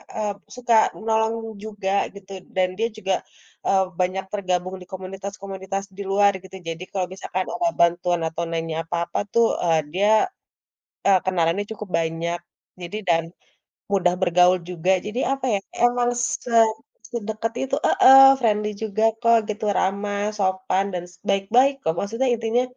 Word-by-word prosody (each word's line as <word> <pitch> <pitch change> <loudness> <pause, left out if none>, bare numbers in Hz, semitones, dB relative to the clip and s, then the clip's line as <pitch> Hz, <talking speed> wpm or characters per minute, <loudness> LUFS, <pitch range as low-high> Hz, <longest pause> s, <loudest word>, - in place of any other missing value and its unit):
eee, 210 -2 -1 0.2
suka 245 -1 0 0.2
menolong 220 0 +1 0.3
juga 205 -3 -4 0.2
gitu 195 -1 -13 0.2
dan 185 -1 +3
dia 225 +2 +1
juga, 195 -3 -1 0.5
eee, 190 -1 +4 0.2
banyak 185 +1 0
tergabung 185 -2 -1
di - - -10
komunitas-komunitas 195 +1 -6
di - - -5
luar 200 0 +5
gitu, 190 0 -12
jadi 165 +2 -5
kalau 185 -2 -1
misalkan 190 0 -3
ada 345 -1 0
bantuan 175 0 +2
atau 160 +1 -4
nanya 165 -1 -2
apa-apa, 170 0 -2
tuh, 235 0 +5 0.2
eee, 165 -2 +3
dia, 200 +3 +2 1.0
eee, 195 -1 +6
kenalannya 180 +1 +1
cukup 210 -1 -8
banyak, 165 +1 -2 0.4
jadi 175 +4 -5
dan 165 -1 +3 0.7
mudah 180 -3 +3
bergaul 180 0 +4
juga 180 +1 -1 0.2
jadi 215 +4 -3 0.2
apa, 270 - -10
ya, 200 - 0 0.2
emang 245 0 +3
se 245 0 -2 0.6
sedekat 225 0 -3
itu, 270 +1 -1
heeh, 270 -9 +8 0.2
friendly 210 -3 +1
juga 215 0 -2 0.2
kok 230 -1 +5
gitu 215 +1 -4
ramah, 200 +1 -1 0.2
sopan, 190 0 0
dan 175 -1 -3 0.2
baik-baik, 220 +8 +3
kok, 160 - 0
maksudnya 230 +7 -1
intinya 230 +1 0
195 Hz, 145 wpm, -23 LUFS, 180-220 Hz, 1.0 s, heeh